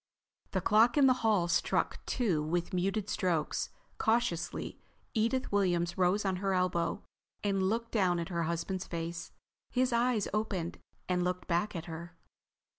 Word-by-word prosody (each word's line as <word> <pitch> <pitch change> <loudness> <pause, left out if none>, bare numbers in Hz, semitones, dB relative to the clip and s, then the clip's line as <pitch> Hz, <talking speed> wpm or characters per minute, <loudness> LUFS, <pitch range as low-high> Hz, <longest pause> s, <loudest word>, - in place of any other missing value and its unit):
The - - -1
clock 230 +4 +4
in 285 - +6
the 260 - +7
hall 210 -6 +3
struck 170 - 0
two 200 -12 +1
with 170 +4 -1
muted 195 +3 0
strokes. 170 -7 0 0.3
Cautiously 220 -7 0 0.3
Edith 235 +4 +1
Williams 175 -4 +1
rose 185 +3 +2
on 190 -1 +1
her 195 0 0
elbow 180 -2 0 0.4
and 200 -2 +1
looked 230 +2 -2
down 185 -5 +2
at 170 +1 -3
her 170 -2 -1
husband's 175 +3 -2
face. 170 0 -4 0.4
His 255 0 +1
eyes 235 -3 +2
opened 195 -5 -2 0.3
and 180 -1 +1
looked 180 0 -2
back 180 +4 0
at 165 -1 -4
her. 170 +1 -8
185 Hz, 150 wpm, -32 LUFS, 170-215 Hz, 0.4 s, the